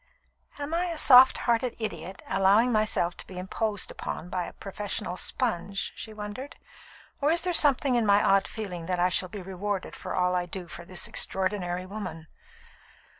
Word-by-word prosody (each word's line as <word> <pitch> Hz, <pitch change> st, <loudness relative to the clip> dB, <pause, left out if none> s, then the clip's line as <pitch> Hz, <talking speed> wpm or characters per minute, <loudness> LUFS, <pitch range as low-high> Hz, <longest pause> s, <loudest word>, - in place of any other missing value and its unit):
"Am 290 Hz, +2 st, -5 dB
I 345 Hz, +2 st, +1 dB
a 340 Hz, -2 st, -3 dB
soft 260 Hz, -2 st, +8 dB
hearted 235 Hz, 0 st, +1 dB
idiot, 190 Hz, -4 st, -5 dB
allowing 195 Hz, +5 st, +4 dB
myself 215 Hz, -5 st, +1 dB
to -, -, -10 dB
be 185 Hz, -, -10 dB
imposed 205 Hz, +3 st, -2 dB
upon 165 Hz, +3 st, -6 dB
by 180 Hz, -2 st, -1 dB
a -, -, -9 dB
professional 205 Hz, -1 st, -5 dB
'sponge'?" 200 Hz, -3 st, -2 dB
she 220 Hz, -, -7 dB
wondered; 215 Hz, +6 st, -7 dB, 0.7 s
"or 290 Hz, +2 st, +3 dB
is 335 Hz, -, +2 dB
there 360 Hz, -1 st, 0 dB
something 280 Hz, -4 st, +4 dB
in 240 Hz, -1 st, +3 dB
my 200 Hz, 0 st, +5 dB
odd 195 Hz, 0 st, +4 dB
feeling 180 Hz, -7 st, -6 dB
that 180 Hz, -1 st, 0 dB
I 180 Hz, +1 st, +3 dB
shall 185 Hz, +1 st, 0 dB
be 200 Hz, 0 st, -7 dB
rewarded 195 Hz, +1 st, -4 dB
for -, -, -5 dB
all 180 Hz, 0 st, +2 dB
I 180 Hz, -1 st, 0 dB
do 180 Hz, 0 st, -7 dB
for 170 Hz, +1 st, -9 dB
this 185 Hz, 0 st, -1 dB
extraordinary 185 Hz, -2 st, -1 dB
woman?" 185 Hz, -5 st, -6 dB
200 Hz, 175 wpm, -27 LUFS, 180-235 Hz, 0.7 s, soft